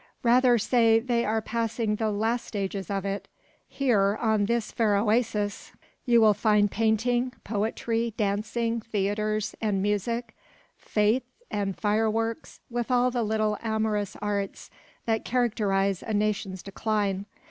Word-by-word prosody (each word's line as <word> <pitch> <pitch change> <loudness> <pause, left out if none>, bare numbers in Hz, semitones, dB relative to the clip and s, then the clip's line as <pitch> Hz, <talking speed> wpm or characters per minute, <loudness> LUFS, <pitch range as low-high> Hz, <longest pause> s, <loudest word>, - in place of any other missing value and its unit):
"Rather 245 0 +5
say 230 0 +4
they 235 0 0
are 220 0 0
passing 230 -1 -1
the 220 0 0
last 225 +3 -1
stages 195 -3 -4
of 200 -1 -2
it. 195 0 -3 0.4
Here, 210 -7 +2
on 220 -3 +2
this 235 0 -1
fair 215 -3 +2
oasis, 210 -1 0 0.3
you 240 -2 +5
will 215 -2 +6
find 210 -1 +2
painting, 240 +3 +1
poetry, 225 +2 -1
dancing, 225 +3 -1
theatres, 215 0 -1
and 210 -3 0
music, 210 +4 -1 0.4
fetes 215 +4 +1 0.2
and 200 -2 -2
fireworks, 225 +2 -1
with 240 0 -3
all 250 0 +3
the 245 -1 -1
little 215 -1 0
amorous 220 -2 -1
arts 200 -1 -3 0.3
that 225 -1 0
characterise 205 -6 +1
a 220 - -3
nation's 205 -3 -1
decline. 200 -1 -1
215 Hz, 130 wpm, -27 LUFS, 205-230 Hz, 0.4 s, will